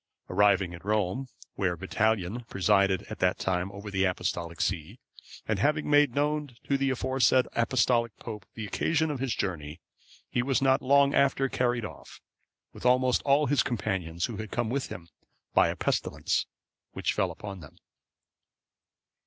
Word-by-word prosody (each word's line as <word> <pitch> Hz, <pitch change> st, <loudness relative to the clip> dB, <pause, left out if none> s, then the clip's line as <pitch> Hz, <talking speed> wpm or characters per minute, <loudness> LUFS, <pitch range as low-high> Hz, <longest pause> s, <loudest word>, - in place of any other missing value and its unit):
Arriving 95 Hz, -2 st, +3 dB
at 85 Hz, -, -10 dB
Rome, 105 Hz, +5 st, 0 dB, 0.3 s
where 90 Hz, -3 st, -1 dB
Vitalian(521) 110 Hz, +4 st, -1 dB
presided 95 Hz, 0 st, +2 dB
at -, -, -6 dB
that -, -, +2 dB
time 95 Hz, +1 st, -1 dB
over 100 Hz, +1 st, -8 dB
the 95 Hz, -1 st, +1 dB
Apostolic 85 Hz, -2 st, -2 dB
see, 80 Hz, -5 st, -2 dB, 0.5 s
and -, -, 0 dB
having 150 Hz, +1 st, +1 dB
made 145 Hz, -4 st, +4 dB
known 145 Hz, -2 st, -1 dB
to 140 Hz, -, 0 dB
the 135 Hz, 0 st, +1 dB
aforesaid 130 Hz, 0 st, +2 dB
Apostolic 115 Hz, -1 st, +1 dB
pope 105 Hz, -4 st, -8 dB
the 110 Hz, -, -5 dB
occasion 160 Hz, -, 0 dB
of 140 Hz, -, -4 dB
his 130 Hz, -3 st, -1 dB
journey, 80 Hz, -4 st, -4 dB, 0.5 s
he 120 Hz, -, 0 dB
was 130 Hz, 0 st, +1 dB
not 135 Hz, -1 st, +3 dB
long 140 Hz, +1 st, +4 dB
after 135 Hz, -1 st, +3 dB
carried 120 Hz, -3 st, 0 dB
off, -, -, -11 dB, 0.5 s
with -, -, -12 dB
almost 125 Hz, 0 st, +3 dB
all 140 Hz, +2 st, +4 dB
his 145 Hz, +1 st, +3 dB
companions 90 Hz, -, -2 dB
who 115 Hz, -, -6 dB
had 110 Hz, 0 st, -6 dB
come 120 Hz, +1 st, -2 dB
with 135 Hz, +1 st, -1 dB
him, 85 Hz, -2 st, -9 dB, 0.5 s
by -, -, +5 dB
a -, -, -2 dB
pestilence -, -, -1 dB, 0.5 s
which -, -, -1 dB
fell -, -, +1 dB
upon 100 Hz, -2 st, -8 dB
them. 75 Hz, -3 st, -14 dB
115 Hz, 160 wpm, -28 LUFS, 95-135 Hz, 0.5 s, by